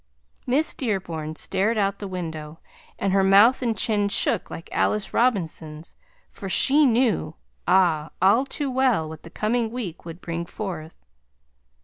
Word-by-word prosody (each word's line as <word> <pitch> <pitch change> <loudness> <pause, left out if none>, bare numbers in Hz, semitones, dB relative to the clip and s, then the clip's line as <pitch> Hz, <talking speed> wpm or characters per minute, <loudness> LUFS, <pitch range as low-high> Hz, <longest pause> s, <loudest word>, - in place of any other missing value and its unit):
Miss 280 +6 +2
Dearborn 170 - -3
stared 205 +7 0
out 200 -1 0
the 200 - -5
window, 160 -4 -6 0.4
and 195 -1 -1
her 195 0 +3
mouth 205 +7 +5
and 230 -4 -1
chin 205 -1 +1
shook 205 0 +2
like 165 - -8
Alice 210 -1 0
Robinson's, 165 -9 -1 0.4
for 195 - -8
she 280 +8 +4
knew, 225 -10 +1 0.3
ah! 170 -4 +3
all 200 +7 +4
to 280 -1 -2
well, 250 -11 +1
what 155 0 -9
the - - -12
coming 225 +5 -1
week 220 -8 -6
would 165 0 -9
bring 170 -1 -4
forth. 170 -7 -7
195 Hz, 145 wpm, -24 LUFS, 165-230 Hz, 0.4 s, mouth